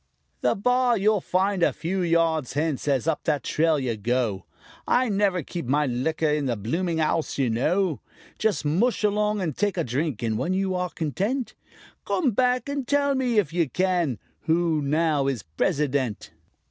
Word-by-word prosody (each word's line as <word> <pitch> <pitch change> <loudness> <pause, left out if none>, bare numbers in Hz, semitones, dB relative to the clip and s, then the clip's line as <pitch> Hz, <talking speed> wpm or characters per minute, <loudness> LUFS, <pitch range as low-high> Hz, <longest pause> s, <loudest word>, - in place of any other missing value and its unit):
"The - - +1
bar 250 +3 +2
you'll 210 0 +2
find 190 +1 0
a - - +4
few 185 +3 -3
yards 165 -5 +1
hence 150 -1 -1
as 140 0 +1
up 165 - 0
that 145 -5 0
trail 160 0 +2
you 130 -5 -1
go; 110 -2 -1 0.4
I 250 -1 +2
never 195 -4 +1
keep 170 -2 -6
my 145 +3 +2
liquor 150 +5 -1
in 150 -2 0
the 120 - 0
blooming 165 - -1
'ouse, 160 +1 0
you 130 -4 +1
know. 160 - +1 0.4
Just 215 -7 0
mush 205 +12 +1
along 210 0 +1
and 160 -7 -2
take 205 -2 0
a 170 - +1
drink, 135 -1 -2
and 110 -2 -1
when 180 - -1
you 190 0 0
are 180 0 -1
content 200 - -2 0.5
Come 295 -9 +1
back 250 +2 +1
and 280 -3 -3
tell 285 0 +2
me, 255 -4 0
if 170 -7 +2
you 170 -5 +1
can, 175 - 0 0.3
who 165 -1 +2
now 150 -1 +1
is 130 -7 -2
President." 130 - -1
165 Hz, 175 wpm, -25 LUFS, 140-200 Hz, 0.5 s, a